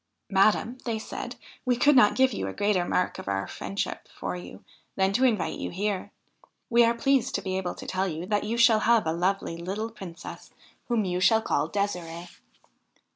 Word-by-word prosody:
' - - -53
Madam/ 215 +5 +3
they 230 -2 -2
said, 215 - -6 0.2
' - - -24
we 250 -1 +2
could 290 +3 +5
not 225 -5 +6
give 260 -1 +3
you - - -3
a - - -4
greater 205 -3 +1
mark 180 - 0
of - - -9
our 100 0 -1
friendship 195 - -4
for - - -5
you, 175 - -10 0.3
than 190 0 +2
to 250 - +2
invite 225 -8 +1
you - - -3
here. 200 +1 -2 0.6
We 235 0 +6
are 230 0 +3
pleased 270 +1 +1
to - - -1
be 185 -1 -2
able 185 -2 -2
to - - -9
tell 190 +1 -1
you 165 0 -4
that 205 +1 0
you 225 +3 -2
shall 235 -2 +6
have 230 -1 +3
a 160 - 0
lovely 180 0 -1
little 200 +6 -4
Princess 185 -6 -9 0.4
whom 230 -4 +1
you 180 -1 -1
shall 220 +4 +4
call - - 0
Ddsirde. 175 -4 -3
200 Hz, 205 wpm, -27 LUFS, 180-230 Hz, 0.6 s, not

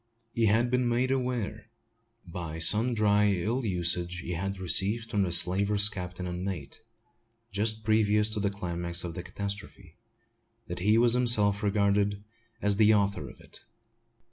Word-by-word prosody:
He 115 -1 +1
had 115 +4 +2
been 125 -1 +1
made 125 +2 0
aware, 120 -5 -3 0.6
by 85 -2 -6
sundry 105 -1 +3
ill 120 +6 -1
usage 90 -2 0
he 90 - -6
had 95 +3 -3
received 100 +5 -1
from 105 -3 +1
the 90 -3 0
slaver's 100 +4 +2
captain 90 -3 -7
and 90 0 -5
mate, 85 -8 -6 0.7
just 110 +2 -2
previous 105 -1 +2
to 110 - -3
the 100 -1 0
climax 85 -3 -3
of 85 -1 -5
the 90 - -6
catastrophe, 100 -1 -8 0.7
that 90 -3 -6
he 105 +5 +3
was 120 0 +4
himself 110 -5 +3
regarded 100 -1 0 0.4
as 100 -1 +1
the 110 0 +5
author 100 -9 -1
of - - -15
it. - - -11
100 Hz, 150 wpm, -28 LUFS, 90-110 Hz, 0.7 s, the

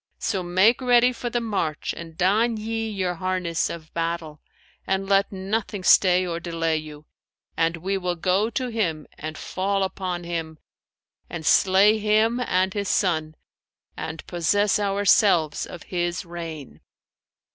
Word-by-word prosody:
So 195 -4 -2
make 190 +8 +3
ready 245 0 +4
for 240 0 -4
the 240 - -1
march 200 -9 -2
and 165 -1 -10
don 220 +6 +2
ye 225 +1 -3
your 190 -4 -2
harness 180 -1 -1
of 160 -2 -9
battle; 165 -2 -3 0.5
and 195 0 -1
let 195 0 +2
nothing 195 +1 -3
stay 185 0 +5
or 170 -1 -3
delay 165 -2 -1
you, 155 -1 -9 0.5
and 165 +1 +1
we 190 +3 -2
will 180 -1 -2
go 185 +5 +1
to 245 +2 -3
him 175 -10 -2
and 155 +1 -6
fall 195 +1 -1
upon 185 -2 -3
him 165 -2 -4 0.7
and 165 -2 -6
slay 200 +5 +5
him 215 +3 +2
and 190 -6 +1
his 200 -2 -2
son, 160 -5 0 0.6
and 160 0 -6
possess 205 +5 +1
ourselves 195 -5 +2
of 175 - -10
his 175 +1 -2
reign.'" 165 - -8
185 Hz, 145 wpm, -24 LUFS, 165-205 Hz, 0.7 s, stay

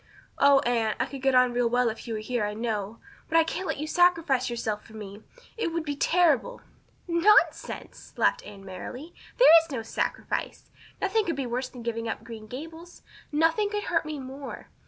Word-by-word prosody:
"Oh, 280 -1 +6
Anne, 230 -4 0
I - - +2
could 275 -2 -8
get 270 -1 +2
on 250 -1 +5
real 240 -1 +1
well 245 +1 +2
if 220 +2 -8
you 225 - -3
were - - -3
here, 240 0 -2
I 210 0 -2
know. 220 -1 -3 0.3
But 330 - +3
I 330 - +6
can't 370 +3 -4
let - - -2
you 300 - -3
sacrifice 325 -7 +2
yourself 220 -3 -3
so - - -19
for 220 - -16
me. 205 0 -9 0.4
It 395 -7 -1
would 335 -1 -2
be 290 -1 -2
terrible." 350 - +2 0.5
"Nonsense!" 345 +5 +2
Anne - - -12
laughed - - +2
merrily. 205 - -9 0.2
"There 410 -10 +9
is 325 - -15
no 255 -6 -4
sacrifice. 225 - -3 0.3
Nothing 415 +2 +1
could 335 - -1
be 275 - -3
worse 250 +2 -3
than 245 -2 -11
giving 230 0 -3
up - - -4
Green 220 -2 -9
Gables 320 +8 -10 0.3
nothing 325 +7 +2
could 415 0 -3
hurt 330 -2 0
me 305 -1 -4
more. 270 +1 -8
265 Hz, 200 wpm, -27 LUFS, 230-330 Hz, 0.5 s, There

